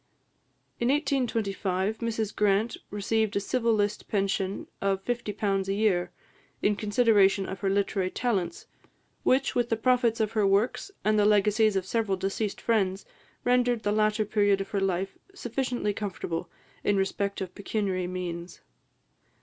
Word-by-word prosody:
In 235 - +1
1825, 220 -8 0
Mrs 225 -3 -2
Grant 210 +2 +2
received 215 +1 0
a - - +3
civil 230 +3 0
list 205 -1 0
pension 195 -2 -1 0.2
of 195 -1 0
£50 205 -5 -1
a 195 - 0
year, 185 -5 +1 0.5
in 205 - +3
consideration 205 -3 +3
of 190 - -6
her 195 - 0
literary 195 -1 0
talents, 245 - -2 0.6
which, 265 +1 +2
with 240 -1 +1
the 225 - +2
profits 240 -1 +2
of 220 -1 +1
her 210 -3 +2
works 200 - +1 0.2
and 215 0 +3
the 205 - +4
legacies 210 +1 +4
of 190 -1 0
several 205 -2 0
deceased 195 +2 -2
friends, 195 -4 +1 0.4
rendered 245 -2 +2
the 205 - +1
latter 215 +1 +2
period 205 -1 +2
of 195 - -4
her 200 - -1
life 190 0 -1 0.2
sufficiently 245 - -2
comfortable 180 -4 -4 0.3
in 205 - +2
respect 200 +1 -1
of 185 -1 -5
pecuniary 195 -3 -2
means. 175 -1 -5
205 Hz, 145 wpm, -28 LUFS, 195-225 Hz, 0.6 s, the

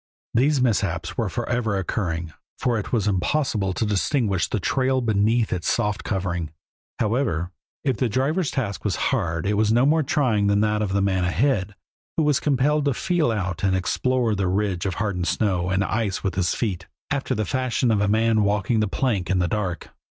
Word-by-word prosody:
These 135 +3 +3
mishaps 95 -7 0
were 115 -4 -1
forever 120 0 -1
occurring, 85 -5 -2 0.2
for 120 -3 0
it 100 - -6
was 110 -4 +1
impossible 100 0 0
to 110 - -1
distinguish 105 - 0
the 110 - -1
trail 130 +5 +1
beneath 110 0 +1
its 90 -1 -1
soft 105 -3 0
covering. 90 -5 -2 0.5
However, 105 - 0 0.3
if 130 -5 0
the 125 +2 0
driver's 140 - 0
task 100 -9 -3
was 100 -4 0 0.2
hard 85 - -1
it 105 - +1
was 105 +1 +2
no 120 +3 +4
more 155 +3 +4
trying 130 -10 +1
than 100 0 +3
that 105 0 +1
of 100 -2 -1
the 100 0 +2
man 95 -2 +1
ahead, 100 +1 0 0.4
who 160 - +3
was 150 -2 +3
compelled 145 +1 +1
to 140 -4 +1
feel 175 -6 +1
out 90 -6 -3
and 95 -1 +2
explore 120 +5 0
the 100 -2 0
ridge 95 -1 0
of 95 - -2
hardened 95 -4 -2
snow 90 -4 0
and 95 +1 +1
ice 105 -3 -1
with 95 -3 -1
his 90 -1 0
feet, 100 -7 -3 0.2
after 135 -2 -1
the 110 -1 -1
fashion 130 0 0
of 105 -2 +2
a 100 - +2
man 110 +1 +3
walking 105 +2 +1
a 105 - +1
plank 95 -5 -1
in 95 - +2
the 90 -1 +2
dark. 95 -3 -3
105 Hz, 195 wpm, -23 LUFS, 95-125 Hz, 0.5 s, no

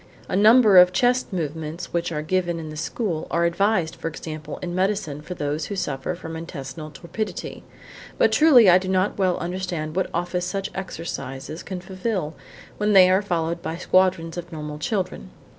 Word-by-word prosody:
A - - -2
number 215 0 +6
of 180 0 +7
chest 245 +6 +1
movements 160 0 -4
which 170 0 -1
are 150 -2 -3
given 175 +1 0
in 155 -1 -7
the - - -8
school 165 +2 -3
are 170 0 +1
advised, 170 -1 +1
for - - -5
example, 155 -1 -6
in 175 -1 -3
medicine 185 -5 -1
for 180 +4 -7
those 150 0 -2
who 200 - -4
suffer 175 -2 -3
from 165 -2 -8
intestinal 155 -2 -7
torpidity, 175 +8 -6 0.6
but - - +4
truly 275 -9 +7
I 180 0 +7
do 185 - -6
not 190 +2 0
well 185 -2 +2
understand 170 -3 -4
what 190 -1 0
office 175 +1 -2
such 195 +1 -3
exercises 155 -5 -6
can 185 -2 -6
fulfil 185 -3 -3 0.5
when 210 0 +2
they 185 -2 +7
are 190 +2 +4
followed 170 -3 -2
by 165 - -4
squadrons 180 -2 +2
of 175 0 -7
normal 150 -2 -6
children. 180 - -3
175 Hz, 175 wpm, -23 LUFS, 160-190 Hz, 0.6 s, of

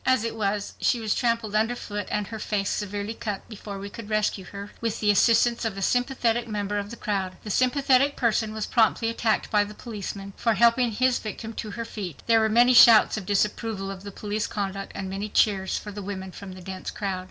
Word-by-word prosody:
As 260 -3 +3
it 230 0 -3
was, 205 -1 -2
she 240 - +2
was 220 -2 0
trampled 230 -4 0
under 220 +3 +2
foot 205 -4 -5
and 210 -1 -1
her 220 +2 -7
face 200 -2 -1
severely 205 +1 -3
cut 210 -4 -5
before 205 -2 -8
we 195 +1 -6
could 210 +1 -9
rescue 210 -3 0
her 200 +2 -8
with 230 -2 -2
the 210 -1 +4
assistance 235 +3 +3
of 220 -4 -2
a 195 - -3
sympathetic 245 0 +1
member 205 -1 -2
of 200 0 -5
the 235 - -7
crowd. 190 -4 -3
The 210 - -5
sympathetic 270 +3 +3
person 220 -3 +1
was 215 -1 -3
promptly 225 -1 +2
attacked 230 -1 0
by 210 -1 +4
the 210 +1 -9
policeman 200 -3 -7
for 230 -2 +1
helping 235 +3 +4
his 255 +3 +2
victim 220 +1 -6
to 215 -1 -5
her 230 - -3
feet. 195 -8 -7
There 230 -1 +5
were 220 0 +2
many 240 +3 +5
shouts 230 -2 +8
of 200 -4 -6
disapproval 205 0 -1
of 190 -1 -8
the 200 - -7
police 210 +2 -3
conduct 195 -1 -4
and 195 -1 -4
many 195 +2 -4
cheers 195 -3 +2
for 210 - -7
the 205 0 -7
women 190 -1 -6
from 190 0 -9
the 185 - -11
dense 190 0 -6
crowd. 195 -3 -3
210 Hz, 220 wpm, -25 LUFS, 200-230 Hz, -, shouts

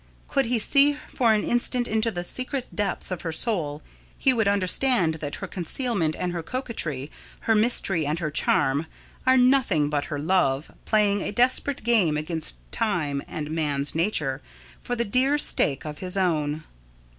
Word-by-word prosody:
Could 275 -4 +1
he 245 0 +1
see 285 +6 +4
for 235 -3 +2
an 215 -1 +2
instant 240 0 +1
into 220 +1 +1
the 175 -5 -4
secret 255 +6 -3
depths 200 -3 -2
of 180 - -3
her 165 - -3
soul, 160 -6 -2 0.3
he 265 - +4
would 220 -4 +1
understand 200 -1 +2
that 145 -2 -4
her - - -6
concealment 185 - -1
and 180 - -2
her 170 - -3
coquetry, 160 - -4 0.3
her 225 - +2
mystery 210 -8 +1
and 150 +2 -1
her 160 -3 -3
charm, 145 +1 +1 0.4
are 260 0 +6
nothing 250 - +3
but 145 -1 0
her 145 - -4
love, 150 -3 +1
playing 205 -2 +2
a - - -3
desperate 250 +4 +1
game 205 -10 +3
against 155 +1 +1
Time 160 -11 -1
and 150 -1 -5
man's 145 -3 -1
nature, 155 -6 0 0.4
for 245 - -3
the 235 0 -1
dear 260 +7 +2
stake 140 - 0
of 150 -1 -6
his 185 +1 -3
own. 155 -4 0
185 Hz, 170 wpm, -25 LUFS, 155-235 Hz, 0.4 s, are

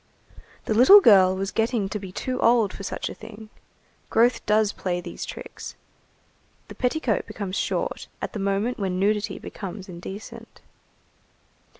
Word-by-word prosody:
The - - 0
little 260 - +9
girl 190 - +6
was 195 +1 -3
getting 225 -2 0
to 210 - -4
be 190 -2 -8
too 255 +7 -3
old 230 -4 +3
for - - -9
such 200 - -4
a - - -5
thing. 220 0 -12 0.6
Growth 235 +2 +3
does 210 0 +3
play 180 -2 -2
these 175 - -7
tricks. - - -9 0.9
The - - -8
petticoat 250 -3 -1
becomes 195 -2 -5
short - - -2
at - - -5
the 215 - -4
moment 200 +5 -1
when 190 -2 -1
nudity 210 +1 0
becomes 195 0 -8
indecent. 190 +3 -10
210 Hz, 150 wpm, -24 LUFS, 195-230 Hz, 0.9 s, little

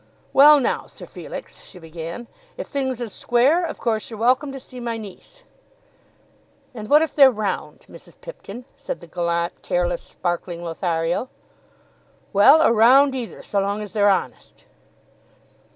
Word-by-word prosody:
"Well, 295 +2 +8
now, 265 - -2
Sir - - -9
Felix," - - -10
she 185 - -14
began, 165 +6 -8 0.3
"if - - -5
things 265 -3 -3
is 230 -5 -5
square, 265 +9 +2
of 340 - -4
course 220 -3 -2
you're 225 - -8
welcome 255 +5 +2
to 270 - -7
see 255 -1 -11
my 235 -1 -4
niece." 220 - -12 1.3
"And 215 -2 -8
what 300 +2 +6
if 320 - -4
they're 275 -3 +7
round, 200 -9 -4
Mrs. - - -15
Pipkin?" 245 - -10
said - - -6
the - - -13
gallant, 170 0 -3
careless, - - -1
sparkling 175 -1 -4
Lothario. 170 +5 -2 1.0
"Well, 275 +11 +6
or - - +4
round 260 +5 +5
either, 250 -4 -6
so 200 - -1
long 200 +2 -2
as 205 - -10
they're 205 -2 +3
honest." 195 - -3
230 Hz, 150 wpm, -22 LUFS, 190-270 Hz, 1.3 s, Well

